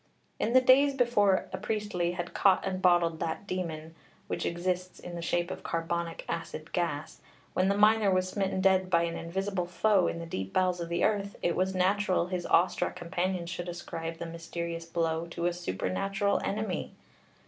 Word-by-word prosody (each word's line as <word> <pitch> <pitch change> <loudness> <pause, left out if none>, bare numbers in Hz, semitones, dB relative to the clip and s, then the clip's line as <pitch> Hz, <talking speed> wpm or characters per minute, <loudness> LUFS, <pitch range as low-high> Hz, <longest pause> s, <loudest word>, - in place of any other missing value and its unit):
In 230 - 0
the 255 - +7
days 275 +2 +5
before 205 -7 +3
a 190 - -3
Priestley 205 -5 -1
had 175 -1 -5
caught 195 -2 +4
and 190 -1 -2
bottled 175 -3 +3
that 165 +4 -3
demon 165 -4 -4 0.3
which - - -2
exists 180 +1 -2
in 175 - -8
the 170 - -5
shape 175 +1 0
of - - -6
carbonic 165 0 -3
acid 165 -1 -5
gas, 160 -4 -2 0.3
when 185 +1 +2
the 200 - +2
miner 210 0 +5
was 185 -1 +2
smitten 190 0 -1
dead 190 -1 +3
by 170 -2 +4
an 170 0 -2
invisible 190 +1 -2
foe 195 +1 +3
in - - -2
the 170 - -5
deep 95 - -5
bowels 185 -1 +2
of 170 -1 -4
the 170 +1 0
earth 200 -2 +1
it 175 - +1
was 185 +1 0
natural 185 -1 +2
his 180 -1 -3
awestruck 180 - +2
companions 175 0 -2
should 175 0 -4
ascribe 165 -1 -5
the 170 - -5
mysterious 170 0 -5
blow 165 0 -1
to 170 0 -4
a 175 - +2
supernatural 180 - -1
enemy. 210 -2 -3
180 Hz, 180 wpm, -29 LUFS, 170-195 Hz, 0.3 s, the